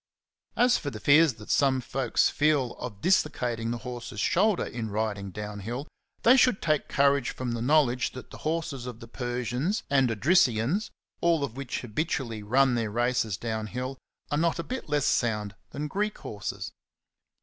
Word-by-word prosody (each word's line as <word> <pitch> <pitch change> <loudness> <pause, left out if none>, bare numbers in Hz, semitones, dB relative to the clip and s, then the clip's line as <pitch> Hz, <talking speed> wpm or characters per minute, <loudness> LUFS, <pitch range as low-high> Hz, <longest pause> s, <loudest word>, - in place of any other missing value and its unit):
As 245 0 +4
for 145 - -4
the - - -8
fears 150 -2 +5
that 105 -1 -7
some 135 -2 +3
folks 125 0 +1
feel 145 -5 +2
of 105 -5 -7
dislocating 120 -10 +1
the 120 - -2
horse's 120 -2 -6
shoulders 190 - +2
in 115 -2 -3
riding 100 -1 -2
down 105 +1 -6
hill, 120 +8 -5 0.4
they 245 +3 +7
should 250 -5 +4
take 155 -2 0
courage 140 -2 +2
from 125 -2 -4
the 115 -1 -3
knowledge 130 -2 +2
that 130 - -10
the - - -10
horses 155 -5 -3
of 120 -2 -7
the 115 - -10
Persians 125 - -2
and 135 -3 +4
Odrysians/s 125 - +2 0.3
all 170 -3 +3
of 140 - -3
whom 140 -1 -6
habitually 120 -2 -2
run 130 +5 +3
their 115 -2 0
races 120 -2 0
down 110 -1 -3
hill, 130 +3 -5 0.3
are 145 - +1
not 170 0 +1
a 170 - -3
bit 255 -6 -6
less 145 -2 +1
sound 105 -4 0 0.2
than 150 +2 -4
Greek 210 +6 -2
horses. 105 -1 -6
125 Hz, 170 wpm, -27 LUFS, 115-150 Hz, 0.4 s, they